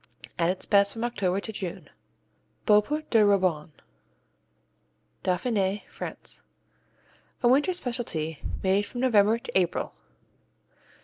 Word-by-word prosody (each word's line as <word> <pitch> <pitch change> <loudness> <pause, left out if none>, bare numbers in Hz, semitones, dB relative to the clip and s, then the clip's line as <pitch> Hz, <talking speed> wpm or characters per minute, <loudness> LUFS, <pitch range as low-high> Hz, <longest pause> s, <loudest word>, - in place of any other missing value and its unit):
At 170 0 +3
its 185 +1 -1
best 200 -1 +4
from 225 - -5
October 195 -6 0
to 220 - -5
June. 185 -4 -6 0.8
Beaupré 265 +9 +3
de 225 - +5
Roybon 185 -7 +2 1.5
Dauphiné, 195 +1 0
France - - -6 1.0
A - - +5
winter 280 +8 +4
specialty 235 - -3 0.2
made 195 +2 +2
from 245 - -6
November 220 -3 +4
to 235 - -9
April. 180 -3 +1
205 Hz, 110 wpm, -27 LUFS, 185-240 Hz, 1.5 s, de